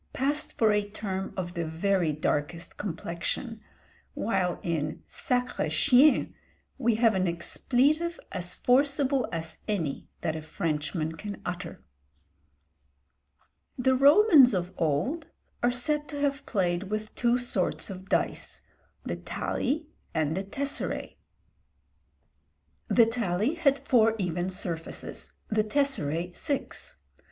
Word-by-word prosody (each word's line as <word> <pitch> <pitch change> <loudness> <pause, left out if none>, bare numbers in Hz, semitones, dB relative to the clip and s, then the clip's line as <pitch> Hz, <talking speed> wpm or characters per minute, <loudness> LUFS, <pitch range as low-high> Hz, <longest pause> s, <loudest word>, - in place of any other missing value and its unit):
_ - - -40
passed 290 +3 0
for 220 -2 +4
a 210 0 +1
term 195 -2 -4
of 175 -1 -3
the 170 - -2
very 165 +1 +1
darkest 150 +3 -2
complexion; 205 +5 -4 0.5
while 185 -5 0
in 155 -3 -2
sacré 250 -10 -1
chien, 265 - +4 0.5
we 235 -3 +3
have 225 0 +4
an 185 -1 +1
expletive 280 - +1
as 180 -1 -3
forcible 275 0 +2
as 165 -1 -5
any 170 -10 -2
that 160 -2 -1
a 160 - -4
Frenchman 155 -1 -2
can 200 +5 -7
utter. 180 - -5 1.9
The 260 +1 +3
Romans 280 - +7
of 180 0 -2
old 170 - 0 0.3
are 240 - +4
said 295 +5 0
to 290 - -6
have 285 0 -1
played 185 -2 0
with 215 0 -3
two 240 0 +2
sorts 225 -7 0
of 190 0 -9
dice, - - -1 0.4
the - - -3
tali 310 +5 -2 0.3
and 155 0 +1
the 190 - -1
tesseræ. 280 +8 -3 1.7
The 230 - +6
tali 225 - 0
had 295 -5 +3
four 225 -3 +5
even 180 -2 -1
surfaces, 170 -3 -5 0.2
the 215 -1 +2
tesseræ 180 - 0
six. 320 - -3
210 Hz, 120 wpm, -28 LUFS, 175-260 Hz, 1.9 s, Romans